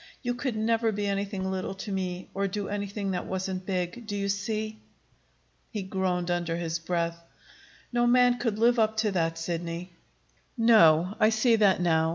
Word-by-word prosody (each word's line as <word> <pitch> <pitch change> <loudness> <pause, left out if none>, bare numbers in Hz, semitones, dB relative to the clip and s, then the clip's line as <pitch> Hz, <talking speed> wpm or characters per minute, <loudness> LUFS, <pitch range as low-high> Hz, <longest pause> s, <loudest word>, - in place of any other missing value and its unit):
You 245 -1 0
could 245 -1 -3
never 225 +1 +1
be 205 0 -2
anything 195 -1 -2
little 190 0 -3
to 200 +2 -6
me, 185 -1 -3
or 195 +1 0
do 200 +1 -3
anything 200 -1 -3
that 180 -1 -3
wasn't 190 0 -3
big. 185 +4 -3
Do 205 - -3
you 200 0 -1
see?" 215 +2 -2 0.9
He 210 -3 -4
groaned 185 -2 -1
under 175 -1 -1
his 170 -1 -2
breath. 170 0 -2 0.7
"No 240 0 +3
man 245 0 +4
could 225 -4 -1
live 235 +2 +4
up 220 0 +2
to 210 - +2
that, 165 -3 0
Sidney." 170 +1 -4 0.7
"No. 185 -6 +5
I 215 -1 +5
see 225 +2 +3
that 200 -4 +4
now. 160 -2 +2
195 Hz, 175 wpm, -28 LUFS, 180-220 Hz, 0.9 s, No